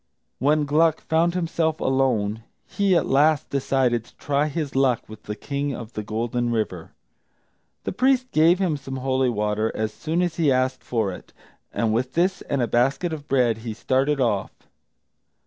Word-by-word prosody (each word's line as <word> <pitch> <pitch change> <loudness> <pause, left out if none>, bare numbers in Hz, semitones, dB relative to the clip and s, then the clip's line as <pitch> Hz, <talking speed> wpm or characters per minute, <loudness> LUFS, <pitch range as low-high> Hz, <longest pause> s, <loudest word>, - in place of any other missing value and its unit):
When 150 +3 +2
Gluck 155 +2 +3
found 165 +2 +1
himself 165 -2 0
alone, 115 -5 0 0.2
he 200 -2 +1
at - - +2
last 145 +2 +2
decided 130 -4 +1
to - - -21
try 145 +1 0
his 150 -2 -4
luck 130 -3 +2
with 110 0 -11
the 105 - -6
King 140 +4 -3
of 115 -1 -9
the 105 - -3
Golden 115 +3 -2
River. 105 -7 -3 0.9
The - - -3
priest 255 +3 +1
gave 165 +3 +5
him 180 -6 0
some 135 -1 -7
holy 130 0 +1
water 105 0 0
as 110 0 -2
soon 165 +3 -1
as 175 -2 -2
he 155 -5 +3
asked 130 0 0
for 110 -5 -1
it, - - -12 0.4
and 110 -2 0
with 125 +3 -1
this 185 +3 +1
and 140 -3 -1
a - - 0
basket 135 +8 +1
of 150 -2 -7
bread 120 -4 +2
he 110 -1 -6
started 135 +5 +1
off. 110 -6 +1
135 Hz, 175 wpm, -23 LUFS, 115-155 Hz, 0.9 s, gave